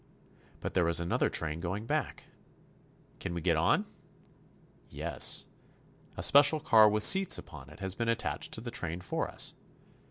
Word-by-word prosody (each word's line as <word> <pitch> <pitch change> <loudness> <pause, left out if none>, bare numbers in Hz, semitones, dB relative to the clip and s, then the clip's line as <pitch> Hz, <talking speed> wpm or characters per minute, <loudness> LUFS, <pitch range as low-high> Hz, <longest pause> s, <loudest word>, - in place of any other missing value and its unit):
But - - -5
there 90 -3 +1
is 85 - +3
another 85 +1 -1
train 80 0 -3
going 95 +6 -5
back. 150 +3 -3 1.0
Can 85 - -6
we 85 - -4
get - - +1
on? - - +1 1.0
Yes; - - +1 0.7
a - - -3
special 145 +2 +5
car 110 -7 +5
with 105 0 +2
seats 190 -1 +6
upon 65 +1 -12
it 75 +6 -16
has 95 -1 -1
been 115 +3 -3
attached 115 0 -3
to 110 - -6
the 120 0 -7
train 85 -8 -4
for 90 - -4
us. - - +1
105 Hz, 160 wpm, -29 LUFS, 85-120 Hz, 1.0 s, seats